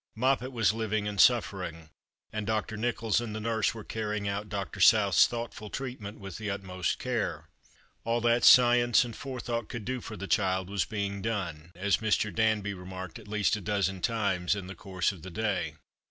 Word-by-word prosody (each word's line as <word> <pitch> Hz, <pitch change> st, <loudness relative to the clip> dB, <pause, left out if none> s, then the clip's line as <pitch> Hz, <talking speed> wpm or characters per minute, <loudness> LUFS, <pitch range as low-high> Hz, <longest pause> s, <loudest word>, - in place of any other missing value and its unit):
:\toppet 130 Hz, +1 st, +1 dB
was 115 Hz, -4 st, +2 dB
living 110 Hz, -2 st, -1 dB
and 100 Hz, -2 st, +2 dB
suffer 110 Hz, -6 st, +4 dB
ing; 80 Hz, -2 st, -8 dB, 0.4 s
and 110 Hz, -1 st, -3 dB
Dr. 110 Hz, 0 st, -1 dB
Xicholls 115 Hz, 0 st, 0 dB
and 110 Hz, -3 st, -5 dB
the -, -, -3 dB
nurse 110 Hz, 0 st, 0 dB
were 110 Hz, -, -7 dB
carrying 105 Hz, -2 st, -3 dB
out 100 Hz, +1 st, -3 dB
Dr. 100 Hz, 0 st, -4 dB
South's 100 Hz, -2 st, +6 dB
thoughtful 115 Hz, -3 st, -6 dB
treatment 120 Hz, -6 st, -6 dB
with 95 Hz, -3 st, -7 dB
the 105 Hz, -1 st, -3 dB
utmost 95 Hz, -3 st, -2 dB
care. -, -, -3 dB, 0.5 s
All 115 Hz, +1 st, +1 dB
that 120 Hz, +1 st, +3 dB
science 120 Hz, -1 st, +7 dB
and 115 Hz, -2 st, -7 dB
forethought 120 Hz, -4 st, -4 dB
could 115 Hz, -4 st, -6 dB
do 130 Hz, 0 st, -3 dB
for 110 Hz, -1 st, -8 dB
the 100 Hz, -, -5 dB
child 95 Hz, -2 st, +1 dB
was 100 Hz, -6 st, 0 dB
being 100 Hz, 0 st, -3 dB
done, 90 Hz, -7 st, -3 dB
as 95 Hz, +2 st, +2 dB
]Mr. 110 Hz, -1 st, 0 dB
Dauby 110 Hz, -2 st, +1 dB
remarked 95 Hz, 0 st, -8 dB
at 110 Hz, -, -14 dB
least 105 Hz, 0 st, +1 dB
a 105 Hz, -, -5 dB
dozen 95 Hz, -2 st, -1 dB
times 100 Hz, -5 st, +1 dB
in 100 Hz, -3 st, -5 dB
the 95 Hz, -, -7 dB
course 95 Hz, 0 st, -1 dB
of 95 Hz, -4 st, -12 dB
the 95 Hz, -, -8 dB
day. 90 Hz, -5 st, -2 dB
105 Hz, 190 wpm, -29 LUFS, 95-115 Hz, 0.5 s, science